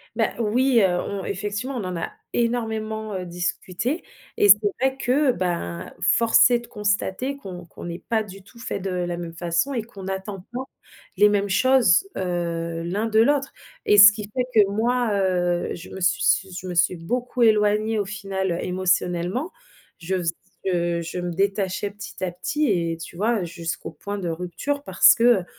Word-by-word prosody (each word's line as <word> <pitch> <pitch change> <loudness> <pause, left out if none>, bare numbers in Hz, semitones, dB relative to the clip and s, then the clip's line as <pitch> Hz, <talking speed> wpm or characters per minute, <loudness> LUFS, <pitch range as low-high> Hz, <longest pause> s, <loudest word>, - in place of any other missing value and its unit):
Bah, 225 -1 +2
oui, 235 +2 +3
heu, 190 - +5
on 200 -1 -4
effectivement 205 +8 -3
on 225 - -3
en 185 -1 -4
a 165 - -4 0.2
énormément, 220 -2 -2
heu, 185 -1 -4
discuté 180 - -3 0.3
et 205 - +4
c'est 200 - +10 0.2
vrai 265 +1 +1
que, 265 +2 +2
ben, 170 - -3
force 230 0 +5
est 240 - +3
de 240 - -13
constater 210 +6 -1
qu'on 180 -8 -9
qu'on - - -11
n'est 170 0 -5
pas 225 -1 +2
du 195 -2 -12
tout 230 - -19
faits 200 - -4
de 195 - -2
la 175 -1 -2
même 170 -1 -6
façon 170 +10 -1
et 235 -4 -2
qu'on 200 -4 -12
n'attend 190 0 -5
pas 250 +2 -4 0.5
les 210 +2 +6
mêmes 205 -1 0
choses, 255 - +4
heu, 170 -2 -2
l'un 195 +6 -2
de 220 -1 +2
l'autre 280 +4 +2 0.3
et 210 - +4
ce 205 +1 +11
qui 215 0 -6
fait 250 -1 0
que 210 -3 +6
moi, 240 +2 +1
heu, 180 -3 +1
je 175 - -10
me 190 - -8
suis 185 +1 +2
s 190 -2 +1
je 185 - -8
me 180 - -4
suis 175 +1 +3
beaucoup 245 +8 -2
éloignée 215 0 +3
au 205 - 0
final, 195 -2 -3
heu, 170 - -1
émotionnellement. 180 - 0 0.5
Je 180 +3 -2
faisais 170 -2 -1 0.3
je 175 -2 0
je 170 +2 -5
me 175 0 -3
détachais 195 +1 -1
petit 200 -1 -9
à 180 - -1
petit 290 - -1
et 170 -4 0
tu 165 +1 -9
vois, 220 +3 +1
heu, - - -3
jusqu'au 170 -1 -5
point 200 +6 -6
de 180 -4 -3
rupture 180 - -3
parce - - +6
que, 230 - -1 0.2
heu, - - -12
195 Hz, 190 wpm, -23 LUFS, 175-225 Hz, 0.5 s, ce